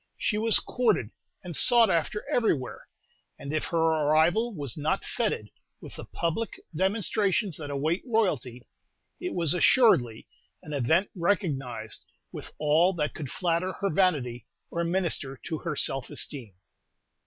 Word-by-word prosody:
She 210 Hz, -, 0 dB
was 225 Hz, 0 st, +3 dB
courted 215 Hz, -, 0 dB, 0.3 s
and 175 Hz, -3 st, -6 dB
sought 235 Hz, -, +6 dB
after 170 Hz, +5 st, -1 dB
everywhere; 145 Hz, -, -1 dB, 0.5 s
and 140 Hz, +2 st, -6 dB
if 155 Hz, -, -1 dB
her 170 Hz, -, -2 dB
arrival 160 Hz, +7 st, +3 dB
was 140 Hz, -6 st, -4 dB
not 155 Hz, +6 st, -1 dB
fêted 210 Hz, -, -2 dB, 0.3 s
with -, -, -11 dB
the -, -, -8 dB
public 170 Hz, +7 st, -3 dB, 0.2 s
demonstrations 195 Hz, 0 st, +1 dB
that 145 Hz, -2 st, -6 dB
await 150 Hz, +5 st, -1 dB
royalty, 145 Hz, -, -1 dB, 0.5 s
it 360 Hz, -, -4 dB
was 170 Hz, -4 st, +2 dB
assuredly 170 Hz, -, +4 dB, 0.4 s
an 150 Hz, -, -7 dB
event 160 Hz, -, +1 dB
recognized 140 Hz, -, -2 dB, 0.3 s
with -, -, -9 dB
all 155 Hz, +5 st, +3 dB
that 150 Hz, -4 st, -2 dB
could 145 Hz, -4 st, -6 dB
flatter 180 Hz, +3 st, -1 dB
her 200 Hz, -1 st, -2 dB
vanity 135 Hz, -, +1 dB, 0.2 s
or 170 Hz, -, -1 dB
minister 170 Hz, -6 st, -1 dB
to 160 Hz, -2 st, -4 dB
her 165 Hz, -4 st, -3 dB
self 135 Hz, -2 st, 0 dB
esteem. 120 Hz, -10 st, -5 dB
165 Hz, 140 wpm, -27 LUFS, 140-195 Hz, 0.5 s, sought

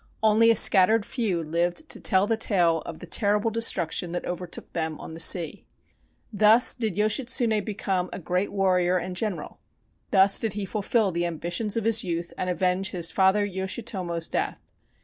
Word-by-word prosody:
Only 220 Hz, +1 st, +4 dB
a 230 Hz, -, +5 dB
scattered 205 Hz, +2 st, +5 dB
few 195 Hz, -9 st, -2 dB
lived 175 Hz, -, -2 dB
to -, -, -4 dB
tell 190 Hz, -1 st, +2 dB
the 225 Hz, +2 st, 0 dB
tale 175 Hz, -7 st, +1 dB
of 165 Hz, -, -7 dB
the 180 Hz, -, -10 dB
terrible 210 Hz, +4 st, 0 dB
destruction 180 Hz, -6 st, 0 dB
that 175 Hz, -, -4 dB
overtook 180 Hz, 0 st, -7 dB
them 160 Hz, -2 st, -3 dB
on -, -, -9 dB
the 165 Hz, -, -9 dB
sea. 165 Hz, -1 st, 0 dB, 0.7 s
Thus 215 Hz, +4 st, +5 dB
did 220 Hz, -7 st, -2 dB
Yoshitsune 220 Hz, +1 st, 0 dB
become 195 Hz, -4 st, -3 dB
a -, -, -6 dB
great 180 Hz, +2 st, -2 dB
warrior 185 Hz, -2 st, +1 dB
and 180 Hz, +1 st, -5 dB
general. 200 Hz, -1 st, -4 dB, 0.5 s
Thus 195 Hz, 0 st, +4 dB
did 225 Hz, -3 st, -3 dB
he 205 Hz, -1 st, -4 dB
fulfill 210 Hz, +1 st, 0 dB
the 170 Hz, 0 st, -1 dB
ambitions 175 Hz, +6 st, -3 dB
of 225 Hz, -, -2 dB
his 225 Hz, 0 st, +3 dB
youth 170 Hz, -2 st, -4 dB
and 185 Hz, -, -3 dB
avenge 185 Hz, +2 st, 0 dB
his 170 Hz, -2 st, -2 dB
father 195 Hz, +2 st, +2 dB
Yoshitomo's 190 Hz, -3 st, -4 dB
death. -, -, -3 dB
190 Hz, 170 wpm, -25 LUFS, 175-215 Hz, 0.7 s, a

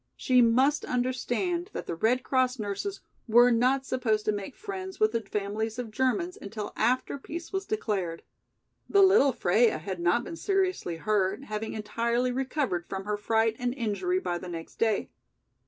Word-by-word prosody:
She 255 Hz, -2 st, +3 dB
must 260 Hz, +6 st, +3 dB
understand 255 Hz, +9 st, -1 dB
that -, -, -5 dB
the -, -, -3 dB
Red 230 Hz, +9 st, +1 dB
Cross 255 Hz, -1 st, +1 dB
nurses 215 Hz, -, -4 dB, 0.3 s
were 240 Hz, +2 st, +6 dB
not 255 Hz, +3 st, +2 dB
supposed 220 Hz, -5 st, 0 dB
to -, -, +3 dB
make 205 Hz, +5 st, -5 dB
friends 380 Hz, -3 st, -6 dB
with 215 Hz, 0 st, +4 dB
the 230 Hz, 0 st, -1 dB
families 215 Hz, +2 st, -3 dB
of 240 Hz, -3 st, -5 dB
Germans 260 Hz, -, 0 dB
until 210 Hz, +1 st, -6 dB
after 255 Hz, +4 st, 0 dB
peace 335 Hz, +7 st, -7 dB
was 385 Hz, 0 st, -2 dB
declared. 195 Hz, -, -2 dB, 0.7 s
The 400 Hz, -1 st, +6 dB
little 380 Hz, -8 st, +6 dB
Freia 225 Hz, -2 st, +3 dB
had 180 Hz, +3 st, -5 dB
not 175 Hz, +8 st, +2 dB
been 330 Hz, -, -7 dB
seriously 375 Hz, -, 0 dB
hurt, 200 Hz, +4 st, 0 dB
having 215 Hz, -3 st, -4 dB
entirely 235 Hz, +3 st, 0 dB
recovered 255 Hz, -, -1 dB
from 190 Hz, 0 st, -4 dB
her 210 Hz, 0 st, -1 dB
fright 220 Hz, +2 st, +1 dB
and 245 Hz, 0 st, -1 dB
injury 260 Hz, -, -1 dB
by 175 Hz, -, -2 dB
the 180 Hz, -, -8 dB
next 165 Hz, -1 st, -8 dB
day. 220 Hz, -3 st, 0 dB
235 Hz, 170 wpm, -28 LUFS, 210-270 Hz, 0.7 s, were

